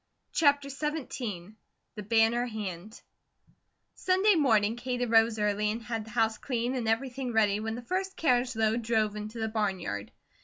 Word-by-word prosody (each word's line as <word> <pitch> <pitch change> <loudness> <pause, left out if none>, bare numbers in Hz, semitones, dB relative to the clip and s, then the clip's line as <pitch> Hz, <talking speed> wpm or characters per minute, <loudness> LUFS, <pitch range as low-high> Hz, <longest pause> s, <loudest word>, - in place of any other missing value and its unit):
CHAPTER 285 -2 +3
XVII 255 - -4 0.4
THE 210 - -7
BANNER 225 +3 +2
HAND 210 -2 -6 0.9
SUNDAY 380 +3 +3
morning 225 - +3
Kate 245 0 -3
arose 225 -1 +3
early 210 0 +1
and 225 +2 -3
had 225 -2 -4
the - - -12
house 225 -1 +1
clean 245 -1 -2
and 245 -4 -2
everything 250 +2 -1
ready 210 -2 +3
when 220 +1 -3
the 245 - -7
first 380 +7 -3
carriage 250 -4 +2
load 220 +1 +1
drove 220 -2 0
into 210 +2 -6
the 220 - -1
barnyard. 190 - -2
225 Hz, 155 wpm, -29 LUFS, 215-250 Hz, 0.9 s, CHAPTER